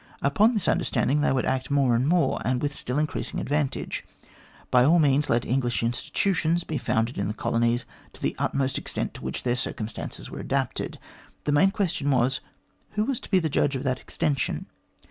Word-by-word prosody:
Upon 210 - +4
this 210 - 0
understanding 150 +2 +2
they - - +3
would 130 -2 +1
act 130 -1 -1
more 140 -4 +3
and 120 +4 +2
more, 175 +1 +2
and 125 +1 +1
with 145 +2 -1
still 125 -2 -3
increasing 150 +1 -2
advantage. 145 -1 -1 0.7
By 125 0 +6
all 160 +7 +5
means, 145 -2 +3
let 120 0 +2
English 120 -4 0
institutions 165 +7 0
be 155 -3 -3
founded 115 0 0
in 100 - 0
the 105 - -3
colonies 120 +1 +1 0.3
to - - -16
the - - 0
utmost 135 -1 0
extent - - -3
to - - -10
which 65 - -3
their 120 -1 +1
circumstances 115 -3 -5
were - - -8
adapted. - - -2 0.5
The 150 - 0
main 150 +7 +5
question 180 -8 -1
was, 130 0 +2 0.5
Who 210 0 +1
was 270 -2 -1
to - - -11
be 190 - +4
the 165 -3 +2
judge 145 -1 +1
of 130 - -3
that 130 -2 0
extension 150 -5 -1
135 Hz, 190 wpm, -26 LUFS, 125-155 Hz, 0.7 s, By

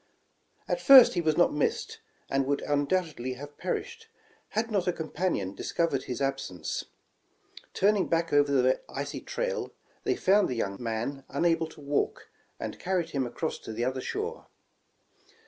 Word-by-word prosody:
At - - -1
first 270 -4 +9
he 175 - 0
was 155 -2 +1
not 175 - +4
missed, 150 - -1 0.3
and 135 -1 0
would 140 0 0
undoubtedly 145 -3 0
have 145 +3 -10
perished, 450 - -4 0.5
had 225 +1 0
not 195 -4 0
a - - +4
companion 160 - -2
discovered 150 +2 -1
his 125 - -4
ab 135 0 0
sence. 90 -3 -5 0.9
Turning 200 0 +3
back 165 -1 0
over 145 0 +4
the 130 -1 +3
icy - - -4
trail, - - -3 0.3
they - - +1
found 200 +2 +3
the 125 - -3
voun^ 100 0 -3
man 120 +4 -3
unable 165 +2 +1
to 155 - -14
walk, 145 0 -1 0.3
and - - -5
carried 180 -3 -1
him 135 -3 -1
across 155 +6 -3
to - - -8
the 120 +2 -1
other 130 0 -1
shore. 440 - -4
150 Hz, 160 wpm, -28 LUFS, 130-185 Hz, 0.9 s, first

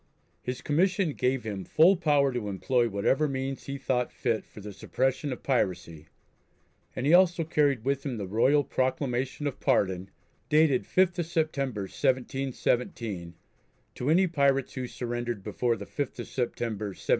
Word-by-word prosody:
His 125 +1 -5
commission 180 +2 +1
gave 130 -1 0
him 100 -4 -4
full 170 - +5
power 145 -6 +2
to 115 -4 -3
employ 120 +5 +1
whatever 115 +9 +1
means 135 -1 -4
he 140 0 -3
thought 125 -2 -1
fit 110 -2 -1
for - - -13
the 105 0 -8
suppression 130 +8 -1
of 125 - -6
piracy, 90 - -1 0.9
and 125 - -3
he 150 - +4
also 175 -1 +5
carried 145 -7 +1
with 140 0 0
him 130 -5 -3
the 100 - -4
royal 130 +9 +3
proclamation 130 +1 -1
of 140 -2 -3
pardon, 95 -8 +1 0.4
dated 150 -4 +4
5th 185 -1 +2
of 170 - -1
September, 140 -9 -1
1717, 125 - -1 0.6
to 125 - -3
any 180 +4 +5
pirates 140 -6 +1
who 130 -2 -4
surrendered 120 -4 -4
before 115 +3 0
the 100 -2 -8
5th 145 +4 -4
of 120 - -6
September, 115 -4 -3
1718. 100 - -8
130 Hz, 155 wpm, -28 LUFS, 115-145 Hz, 0.9 s, full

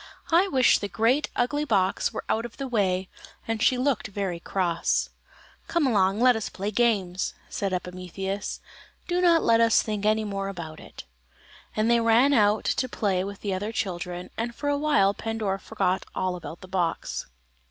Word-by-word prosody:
"I 350 +4 +5
wish 260 -8 +4
the 205 - -3
great 230 +9 +1
ugly 290 +5 0
box 190 -9 +1
were 220 - -5
out 225 - 0
of 240 - -8
the 275 - -4
way;" 190 -6 0 0.4
and 225 -1 -2
she 255 - +4
looked 260 -2 0
very 195 -4 -3
cross. 170 -2 0 0.6
"Come 335 -3 +1
along, 195 -6 +3
and 225 - 0
let 250 -1 +6
us 220 - -3
play 200 +2 -4
games," 200 -5 0
said 195 -1 -2
Epimetheus; 185 +2 -4 0.5
"do 355 0 0
not 340 -2 +4
let 230 0 +4
us 230 -1 +4
think 210 -2 -3
any 215 +1 +2
more 195 -2 -3
about 170 -5 -7
it;" - - -11 0.7
and 215 +1 +1
they 235 0 +4
ran 230 +5 +4
out 210 -3 +3
to 255 - 0
play 195 -5 0
with 200 0 -7
the 200 -2 -2
other 205 +4 -3
children, 180 -4 -4
and 235 +1 -3
for 290 - -2
a 285 - +2
while 285 -10 +3
Pandora 215 -3 -2
forgot 190 -3 -1
all 185 -1 -1
about 170 -1 -8
the 185 - -10
box. 180 -3 -2
210 Hz, 185 wpm, -26 LUFS, 190-235 Hz, 0.7 s, let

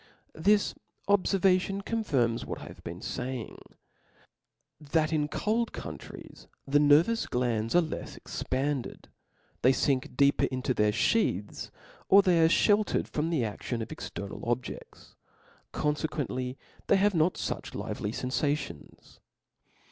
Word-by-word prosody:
This 205 +6 +2 0.3
obicrvation 195 -1 +2
confirms 135 - 0
what - - -5
J - - -8
have - - -13
bcei^, 85 - -6
faying, 125 -2 -4 1.2
that 155 +1 0
in 150 -1 +1
cold 220 +9 -1
countries - - -9 0.2
the 145 +1 +3
nervous 155 +10 +4
glands 115 -1 0
are 175 - +7
left 160 - -5
expanded: 135 0 -3 0.5
they 130 - +6
fink 130 -1 0
deeper 140 0 +4
into 130 0 -1
their 105 -2 +2
Iheaths, 105 - 0 0.4
or 200 +1 +8
they 175 -3 +4
are 160 - +5
flieltered 205 +4 +3
from 155 +2 -2
the 160 -7 +1
adion 115 +2 -3
of - - -10
external 100 0 -6
obje6ls: 120 +1 -5 0.6
confcquently 145 -4 -2 0.3
they - - +5
have 200 +1 +3
not 170 +1 +2
fuch - - -4
lively 105 - -3
fcnfations. 130 - -3
145 Hz, 125 wpm, -29 LUFS, 125-180 Hz, 1.2 s, or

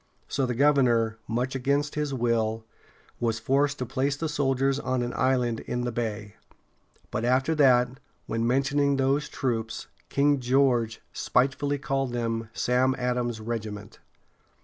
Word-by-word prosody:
So 135 -2 0
the 125 - -2
governor, 120 -5 +3
much 125 +3 -1
against 140 +3 0
his 150 -1 -2
will, 115 -3 0 0.5
was 115 -2 0
forced 140 +4 +1
to 125 - -3
place 135 +3 -1
the 160 +3 -3
soldiers 135 -2 +1
on 130 -2 -1
an 120 - -3
island 125 -3 +1
in 125 - -3
the 120 0 -2
bay. 110 -3 -4 0.7
But 110 - -2
after 130 +5 +2
that, 130 -3 +3 0.3
when 115 +1 -1
mentioning 140 +2 +2
those 135 +2 +1
troops, 115 -4 -3 0.2
King 145 0 +3
George 125 -3 +2
spitefully 140 +3 +1
called 135 -2 -2
them 115 -1 -2
"Sam 125 +3 +1
Adams's 125 -2 -1
regiments." 110 -2 -6
125 Hz, 140 wpm, -27 LUFS, 115-135 Hz, 0.7 s, governor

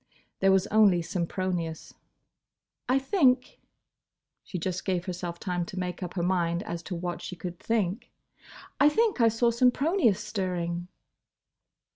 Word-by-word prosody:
There 195 0 +4
was 190 0 +3
only 200 -5 +5
Sempronius. 170 -1 -3 1.0
"I 255 - +4
think—" 265 -4 +2 0.8
she 185 - -6
just 185 +2 -3
gave 185 -2 -1
herself 175 -2 -5
time 180 -2 -2
to 185 - -8
make 180 0 -3
up 180 0 -5
her 175 - -1
mind 175 -1 +1
as 170 0 -5
to 180 - -2
what 175 0 -4
she 180 - -6
could 175 0 -7
think—"I 225 +6 -2
think 435 - +1
I 230 - +6
saw 230 +1 +2
Sempronius 250 - +3
stirring!" 175 -4 -3
185 Hz, 135 wpm, -28 LUFS, 175-230 Hz, 1.0 s, I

